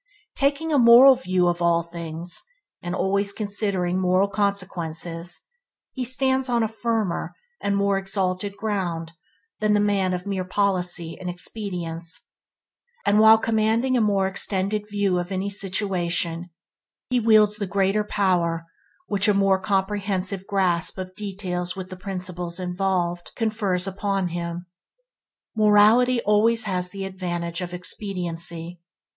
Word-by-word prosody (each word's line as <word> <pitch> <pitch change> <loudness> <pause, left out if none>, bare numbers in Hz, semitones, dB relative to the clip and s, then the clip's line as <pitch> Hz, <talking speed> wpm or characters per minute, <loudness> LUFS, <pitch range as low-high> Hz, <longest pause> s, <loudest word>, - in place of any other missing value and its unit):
Taking 290 +3 0
a 285 - +4
moral 245 +3 +9
view 185 -8 0
of 175 0 -1
all 170 -1 +2
things, 170 0 -4 0.4
and 175 +1 -4
always 200 +1 +1
considering 200 -4 -1
moral 185 +1 +2
consequences, 175 -4 -1 0.5
he 260 - -4
stands 260 +1 0
on 235 -2 +2
a - - +1
firmer 220 -4 -2 0.3
and 200 0 0
more 200 -1 +1
exalted 195 0 -2
ground 180 -6 -3 0.5
than 215 -1 +2
the - - +3
man 200 -2 +1
of 180 +1 -6
mere 195 -2 -2
policy 180 -3 0
and 180 - -5
expedience; 175 -3 -2 0.7
and 205 +1 +4
while 220 +1 +8
commanding 225 +3 +1
a 245 - +3
more 200 -3 +2
extended 195 +2 0
view 200 -3 0
of 175 +2 -5
any 195 +1 -2
situation, 180 -4 -1 0.6
he 250 - +3
wields 215 -2 +4
the 205 -2 -3
greater 195 +3 +1
power 175 -5 0 0.4
which 200 - +1
a 210 - +3
more 195 -1 +3
comprehensive 195 -1 -1
grasp 185 -4 0
of 185 0 -6
details 185 -3 -4
with 190 0 -7
the - - -5
principles 180 -2 -4
involved, 180 -1 -2
confers 215 -5 -1
upon 195 -1 -2
him. 170 0 -5 0.9
Morality 215 +4 +5
always 225 +3 +3
has 180 -3 -1
the 195 0 -6
advantage 175 -2 -4
of 175 -1 -5
expediency. 175 -2 -3
195 Hz, 135 wpm, -23 LUFS, 180-210 Hz, 0.9 s, moral